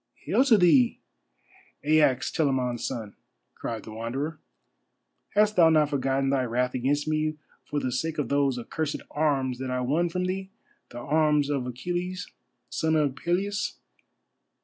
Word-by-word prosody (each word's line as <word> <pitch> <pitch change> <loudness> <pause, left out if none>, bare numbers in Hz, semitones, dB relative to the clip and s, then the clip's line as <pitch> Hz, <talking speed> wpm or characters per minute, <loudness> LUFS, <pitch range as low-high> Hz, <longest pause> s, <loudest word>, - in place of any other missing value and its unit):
"Hail 235 +6 +3
to 235 -6 +6
thee, 230 +7 +4 0.9
Aias, 150 -4 +3
Telamon's 130 -6 0
son," 110 -5 -6 0.4
cried 115 -2 -5
the 110 - -9
Wanderer. 130 +8 -4 1.0
"Hast 210 +1 +4
thou 165 -2 +7
not 155 -2 +3
forgotten 135 0 +1
thy 135 -2 +2
wrath 125 +1 0
against 140 +4 0
me, 155 0 0 0.3
for 145 - -2
the 130 - -2
sake 160 +6 -2
of 145 - -1
those 140 -2 +1
accursed 150 +5 -3
arms 135 -4 0
that 130 -1 -4
I 125 0 -1
won 155 +8 +1
from 180 +2 -2
thee, 190 +1 -3 0.4
the 120 - -10
arms 150 +2 +2
of 135 -3 -1
Achilles, 175 +8 -4 0.4
son 160 0 0
of 145 -4 +1
Peleus? 195 +6 -1
145 Hz, 150 wpm, -27 LUFS, 130-165 Hz, 1.0 s, thou